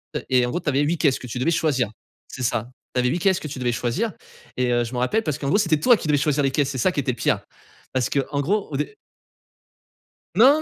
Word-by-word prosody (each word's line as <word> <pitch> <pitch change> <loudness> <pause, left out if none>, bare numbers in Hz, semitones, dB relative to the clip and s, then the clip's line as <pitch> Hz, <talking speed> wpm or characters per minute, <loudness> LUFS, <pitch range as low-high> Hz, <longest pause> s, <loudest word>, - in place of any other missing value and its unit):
Heu - - -2
et 125 -1 +4
en - - -2
gros, 175 - -1
tu 160 - -2
avais 140 0 +2
8 155 +4 +1
caisses 145 -5 +2
que 125 - -8
tu 125 +1 -5
devais 160 +7 +2
choisir. 150 -8 +1 0.4
C'est 130 - -7
ça, 120 0 -1 0.2
tu - - +1
avais 125 0 +2
8 170 +7 0
caisses 190 -1 +2
que - - -6
tu 140 -2 -6
devais 125 -1 +1
choisir. 120 - -1 0.4
Et, 125 -1 +1
heu, 120 0 +2
je 120 +2 -6
me 125 - -1
rappelle 210 - +1
parce 155 -6 -2
qu'en 140 - -4
gros, 150 - +3
c'était 165 -7 +2
toi 240 +6 +5
qui 170 - -6
devais 150 -1 +3
choisir 145 0 +1
les 135 - +2
caisses. 140 0 +1
C'est 140 - -4
ça 185 +9 +2
qui 165 - -2
était 135 -2 0
le - - -6
pire. - - +1 0.5
Parce 130 -2 +1
que 140 - +1
en 140 -1 0
gros, 200 +8 0
au 140 - -2
dé 150 0 -3 1.4
Non, 270 +9 +6
140 Hz, 285 wpm, -23 LUFS, 125-165 Hz, 1.4 s, Non